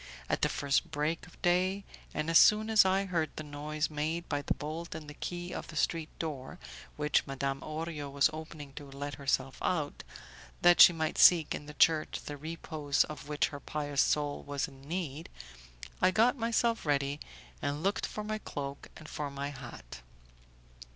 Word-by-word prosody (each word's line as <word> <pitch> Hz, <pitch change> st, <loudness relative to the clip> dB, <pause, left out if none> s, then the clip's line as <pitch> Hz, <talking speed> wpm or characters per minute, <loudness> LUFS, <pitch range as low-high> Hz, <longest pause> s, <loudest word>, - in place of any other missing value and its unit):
At -, -, 0 dB
the -, -, +3 dB
first 140 Hz, -1 st, 0 dB
break 155 Hz, +3 st, -2 dB
of 175 Hz, -, -18 dB
day, 185 Hz, +3 st, +2 dB, 0.3 s
and 150 Hz, +1 st, -2 dB
as 165 Hz, -, +8 dB
soon 215 Hz, +1 st, +5 dB
as 215 Hz, -3 st, +7 dB
I 190 Hz, +1 st, +2 dB
heard 170 Hz, -5 st, 0 dB
the 155 Hz, -, -5 dB
noise 150 Hz, +1 st, -3 dB
made 155 Hz, +3 st, -2 dB
by 145 Hz, -, -1 dB
the -, -, -1 dB
bolt 160 Hz, +3 st, -5 dB
and 155 Hz, -1 st, -7 dB
the 150 Hz, -, -8 dB
key 175 Hz, +3 st, -5 dB
of -, -, -5 dB
the 160 Hz, -, -10 dB
street 160 Hz, +1 st, 0 dB
door, 150 Hz, -1 st, -5 dB, 0.4 s
which 150 Hz, 0 st, +1 dB
Madame 135 Hz, 0 st, -2 dB
Orio 155 Hz, -2 st, -5 dB
was 140 Hz, 0 st, +4 dB
opening 155 Hz, -3 st, -8 dB
to 145 Hz, -1 st, -9 dB
let 145 Hz, +1 st, -5 dB
herself 135 Hz, -1 st, 0 dB
out, 155 Hz, -5 st, -1 dB, 0.6 s
that 175 Hz, 0 st, +7 dB
she 175 Hz, -, +11 dB
might 160 Hz, -2 st, -2 dB
seek 165 Hz, -4 st, +7 dB
in 145 Hz, -, -6 dB
the 150 Hz, -, -9 dB
church 155 Hz, -1 st, +3 dB
the 145 Hz, -, -5 dB
repose 155 Hz, -1 st, -1 dB
of 150 Hz, -2 st, -8 dB
which 150 Hz, -1 st, +1 dB
her 145 Hz, -, -7 dB
pious 145 Hz, -2 st, -1 dB
soul 145 Hz, -1 st, +1 dB
was 145 Hz, +1 st, -2 dB
in 135 Hz, -1 st, -15 dB
need, 160 Hz, -2 st, -4 dB, 0.7 s
I -, -, +6 dB
got 225 Hz, +7 st, +4 dB
myself 230 Hz, -1 st, +1 dB
ready 140 Hz, -1 st, 0 dB, 0.4 s
and 145 Hz, +2 st, -2 dB
looked 195 Hz, +2 st, 0 dB
for 210 Hz, -, -5 dB
my 215 Hz, 0 st, -3 dB
cloak 140 Hz, -6 st, -6 dB
and 155 Hz, -, -11 dB
for 150 Hz, -2 st, -4 dB
my 140 Hz, +1 st, -4 dB
hat. 120 Hz, -, -10 dB
150 Hz, 185 wpm, -31 LUFS, 145-170 Hz, 0.7 s, she